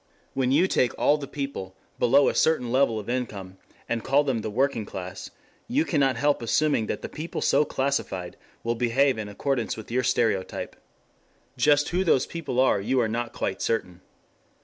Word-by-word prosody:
When 130 -1 0
you 155 +7 +4
take 125 -9 +1
all 150 +1 +3
the 140 - -6
people, 140 -11 -5 0.2
below 135 +4 +5
a - - +2
certain 130 -7 +2
level 130 -3 +3
of 105 - -9
income, 100 -7 -4 0.3
and 115 -1 -2
call 140 +2 +3
them 135 -5 0
the 110 - -4
working 125 +1 0
class, 95 -2 -7 0.4
you 285 +7 +1
cannot 135 -5 +2
help 145 +3 +1
assuming 115 -1 +1
that - - -4
the - - -3
people 155 +2 -6
so 145 +2 +3
classified 130 -11 -2 0.3
will 115 - 0
behave 125 +2 +2
in 105 -1 -5
accordance 120 +3 -2
with 110 +1 -9
your 125 +2 +2
stereotype. 110 -6 -1 0.8
Just 145 +3 +3
who 180 +2 +1
those 150 -7 +3
people 160 -7 -4
are 130 -6 +3
you 125 +6 +1
are 115 - +2
not 120 +1 -3
quite 95 - -3
certain. 90 -6 -2
125 Hz, 180 wpm, -26 LUFS, 110-140 Hz, 0.8 s, below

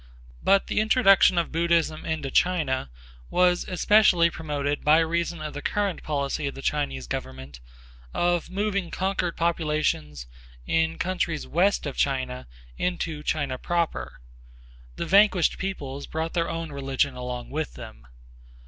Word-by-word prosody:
But 195 0 +3
the - - -1
introduction 215 -4 +5
of 170 - 0
Buddhism 165 -1 +1
into 155 -4 -2
China 150 - +1 0.4
was 180 0 +2
especially 180 -2 +4
promoted 145 -2 -3
by 150 +1 +6
reason 170 0 0
of 150 - -5
the 145 - -6
current 200 0 -1
policy 140 0 -2
of 140 - -5
the 135 - -9
Chinese 145 - -1
government 65 +1 -6 0.5
of 175 -1 0
moving 195 -2 -1
conquered 190 -2 -2
populations 150 - -1 0.4
in 165 - +1
countries 175 -4 -2
west 190 +3 +1
of 140 - -5
China 130 -2 -1 0.3
into 165 -4 -2
China 145 -4 -2
proper, 170 -1 -2 0.8
The - - -3
vanquished 200 -3 +4
peoples 140 -8 -5
brought 160 +1 -3
their 170 -1 0
own 165 -1 -4
religion 135 0 -1
along 125 -1 -6
with 155 +1 -3
them. - - -11
160 Hz, 135 wpm, -25 LUFS, 140-175 Hz, 0.8 s, by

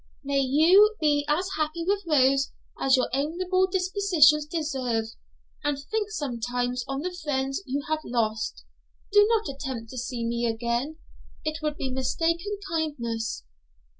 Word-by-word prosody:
May 280 0 0
you 335 +11 +5
be 290 -2 +2
as 340 +6 +1
happy 315 +2 -2
with 400 -1 0
Rose 275 -2 +3 0.3
as 270 0 +4
your 255 - +1
amiable 360 +7 +1
dispositions 360 -6 +3
deserve; 265 -8 -1 0.6
and 290 -1 0
think 415 +9 -3
sometimes 245 - -2
on 270 0 -3
the 360 +2 -4
friends 270 0 -1
you 280 +2 -2
have 310 0 0
lost. 220 - -2 0.5
Do 415 0 +6
not 445 -2 +2
attempt 265 -5 -5
to 255 - -5
see 245 -1 -3
me 235 +1 0
again; 235 +6 -2 0.5
it 310 0 -2
would 300 -1 -2
be 265 - -3
mistaken 335 +9 -1
kindness.' 235 - -2
290 Hz, 140 wpm, -26 LUFS, 250-335 Hz, 0.6 s, Do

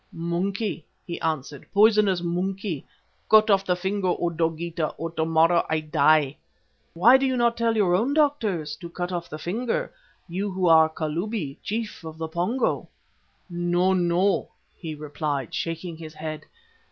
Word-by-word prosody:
"'Monkey,' 175 +1 -2 0.2
he 170 -2 -6
answered, 150 -3 -3
'poisonous 210 -3 +4
monkey. 180 -1 -2 0.5
Cut 215 0 +6
off 195 -1 +4
the 180 -2 +1
finger, 190 +2 -2
O 175 -1 0
Dogeetah, 165 0 -2
or 165 +2 -4
tomorrow 165 +1 +3
I 160 0 +1
die.' 155 -2 +3 0.6
"'Why 230 +10 +7
do 270 0 +1
you 260 -1 0
not 235 -1 +2
tell 230 -1 +1
your 190 -4 +3
own 235 +10 +1
doctors 215 - +1
to 170 - -9
cut 175 +1 -4
off 175 -1 -4
the 155 - -6
finger, 225 +9 -2 0.3
you 195 +4 -3
who 185 -1 -1
are 160 -1 +6
Kalubi, 160 0 -3
Chief 220 -3 -4
of 160 -1 -8
the 160 0 -3
Pongo?' 180 +11 -1 0.6
"'No, 175 +1 +1
no,' 180 +2 +1 0.3
he 160 -3 -6
replied, 145 -3 -3
shaking 165 0 -4
his 155 -1 -10
head. 155 0 -6
175 Hz, 155 wpm, -25 LUFS, 160-200 Hz, 0.6 s, Why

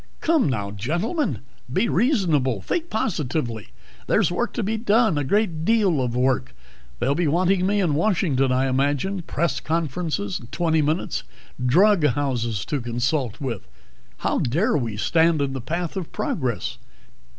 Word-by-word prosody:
"Come, 320 - +2
now, 100 -6 -2
gentlemen, 170 - -1 0.3
be 190 - +2
reasonable. 165 - +2
Think 340 -1 -2
positively! 150 - -2 0.4
There's - - +3
work 220 +6 -1
to 235 - -2
be 215 +3 -1
done, 220 -3 +3
a 145 - 0
great 170 0 0
deal 195 -7 +3
of 120 -2 -2
work. 130 - 0 0.4
They'll 130 +4 +2
be 165 +2 0
wanting 180 +4 +2
me 205 +1 +2
in 175 -6 +2
Washington, 150 -7 +1
I 130 +1 +2
imagine. 145 +8 0
Press 170 0 -1
conference 165 0 -1
in 100 +3 -5
twenty 160 +2 +1
minutes. 155 +4 -1 0.4
Drug 185 +8 +4
houses 120 -7 0
to 145 -3 -2
consult 120 +1 -1
with. 120 -8 -4 0.5
How - - 0
dare 155 - +1
we 115 -7 -2
stand 165 +6 +3
in 140 -1 -1
the 135 - -4
path 170 +7 -3
of 185 -4 -4
Progress? 125 - -2
155 Hz, 150 wpm, -23 LUFS, 130-185 Hz, 0.5 s, Drug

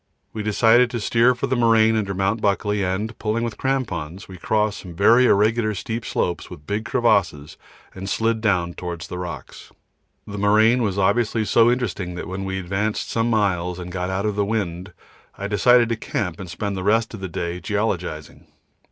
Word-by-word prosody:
We 110 - -4
decided 115 +3 +4
to 120 - -3
steer 120 +4 +3
for 120 - -2
the 130 -1 0
moraine 115 -2 +4
under 100 -3 -1
Mt. 100 +4 0
Buckley 105 0 0
and, 100 +5 -2
pulling 110 +2 -1
with 115 -3 -4
crampons, 100 - -3
we 95 - -10
crossed 105 +1 0
some 90 -3 -10
very 115 +7 +5
irregular 110 +1 +2
steep 115 +4 -4
slopes 85 -2 -2
with 75 - -11
big 105 +5 -3
crevasses 95 - +1 0.4
and 95 +1 -6
slid 115 +1 0
down 90 -6 +1
towards 85 -2 -6
the 90 - -6
rocks. 90 -1 -8 0.5
The 105 0 -7
moraine 110 +4 +4
was 100 -4 -1
obviously 110 +3 +1
so 115 +2 +4
interesting 100 -8 -2
that 90 - -6
when 95 +2 -5
we 95 0 -3
had 95 -1 -4
advanced 105 +4 -2
some 115 +1 0
miles 90 -6 0
and 90 0 -7
got 90 0 -3
out 95 +2 -2
of 105 -1 -1
the 100 - +1
wind, 95 -3 -3 0.5
I 100 - -5
decided 120 +4 +4
to 115 - 0
camp 90 -4 -4
and 95 -2 -7
spend 100 +3 -3
the 95 - -4
rest 110 +3 +1
of 110 - -7
the 95 -1 -5
day 85 +1 -4
geologising. 90 -8 -3
105 Hz, 195 wpm, -22 LUFS, 95-115 Hz, 0.5 s, very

